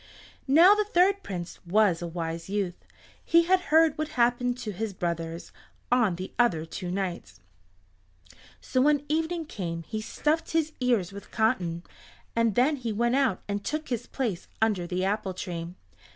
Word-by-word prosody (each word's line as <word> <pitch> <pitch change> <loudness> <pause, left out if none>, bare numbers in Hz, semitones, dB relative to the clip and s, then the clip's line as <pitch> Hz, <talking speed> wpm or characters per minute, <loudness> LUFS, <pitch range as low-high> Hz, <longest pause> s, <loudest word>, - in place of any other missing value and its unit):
Now 330 +8 +8
the 425 0 +2
third 395 0 +3
Prince 180 - -6
was 190 -1 +3
a 175 - -3
wise 165 0 -5
youth; 195 -3 -3 0.4
he 335 +1 +5
had 370 +2 +3
heard 315 -1 +4
what 310 - 0
happened 245 +1 +2
to 220 -4 -5
his 210 +2 -4
brothers 170 -2 -4 0.4
on 235 -8 +3
the 185 +2 -7
other 175 -10 +3
two 180 +2 -6
nights, 180 - -4 1.2
so 255 - 0
when 290 +1 +3
evening 325 +2 -1
came 170 - -5
he 215 +5 -5
stuffed 305 +9 -1
his 315 -1 +1
ears 235 -8 +1
with 200 0 -10
cotton, 180 -7 0 0.5
and 230 -3 +2
then 280 +5 +3
he 235 -3 -3
went 235 +4 +1
out 265 -9 +1
and 205 0 -3
took 305 +6 -3
his 240 -4 -3
place 225 -10 -3
under 205 -6 +1
the 185 +1 -1
apple 200 -1 -1
tree. 175 -3 -5
220 Hz, 165 wpm, -27 LUFS, 180-280 Hz, 1.2 s, Now